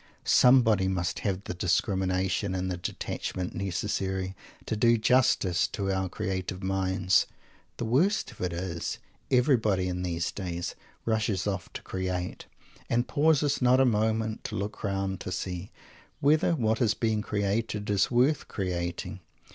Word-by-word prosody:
Somebody 115 -7 +5
must 90 -2 -1
have 100 -2 -2
the - - -4
discrimination 95 +1 0
and 95 0 -2
the 90 - -3
detachment 90 +1 -4
necessary 95 0 -2 0.3
to - - -2
do 115 +2 +4
justice 110 -7 +3
to 95 -1 -2
our 95 -1 -1
"creative 95 +1 -3
minds." 95 -1 +2 0.5
The 120 - -2
worst 165 - +2
of - - -14
it 90 -1 -1
is, 85 -1 -3 0.3
everybody 115 -8 +3
in 90 0 -2
these 85 -2 -1
days 85 -3 -4 0.3
rushes 110 -4 0
off 95 -4 -3
to - - -7
"create," 90 -1 -4 0.4
and 120 +1 +1
pauses 145 -2 +2
not 125 +1 +5
a 135 - +6
moment 110 -1 0
to - - -4
look 100 +2 -4
round 95 -2 -1
to - - -6
see 90 +1 -4 0.5
whether 155 +4 +3
what 110 -4 0
is 115 -2 +3
being 110 -2 0
created 105 +1 -1
is 100 - +2
worth 130 +5 +2
creating! 90 0 -3
100 Hz, 145 wpm, -28 LUFS, 90-110 Hz, 0.5 s, a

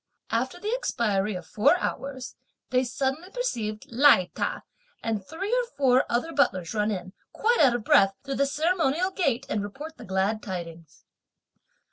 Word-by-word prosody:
After 255 +9 -1
the 420 +4 -3
expiry 215 - 0
of 180 -2 -6
four 215 - +3
hours, 270 -6 -4 0.4
they 255 0 +3
suddenly 270 +7 -2
perceived 230 - -3
Lai 240 -7 +5
Ta - - -2 0.4
and 220 -3 -2
three 375 - -4
or - - -1
four 260 -2 +4
other 250 +8 -1
butlers 185 - +1
run 210 -1 +1
in, 185 -2 -4 0.2
quite 470 +2 +2
out 260 -5 +5
of 240 - -3
breath, 195 -1 +5
through 275 -1 -4
the 280 - +2
ceremonial 325 +3 +1
gate 275 -9 0
and 210 - -1
report 285 +11 -7
the - - -10
glad 190 +3 0
tidings. 170 -4 -8
255 Hz, 160 wpm, -26 LUFS, 205-320 Hz, 0.4 s, Lai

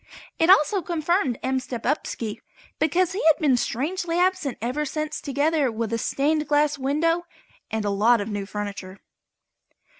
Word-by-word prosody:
It 325 - +3
also 385 +1 +5
confirmed 335 - 0
M. 260 0 0
Stepupski, 240 -3 -3 0.4
because 345 +3 +2
he 380 - -3
has 320 -2 +6
been 290 -6 +3
strangely 330 - -2
absent 360 -7 +1
ever 255 +6 -2
since 305 +1 -4
together 285 -1 +1
with 225 0 -3
a 230 - 0
stained 300 +5 0
glass 295 0 +2
window 330 +6 0 0.4
and 220 -1 -2
a 205 - 0
lot 225 +4 +4
of 205 - -3
new 205 -2 -4
furniture. 200 -2 -6
290 Hz, 150 wpm, -24 LUFS, 230-325 Hz, 0.4 s, has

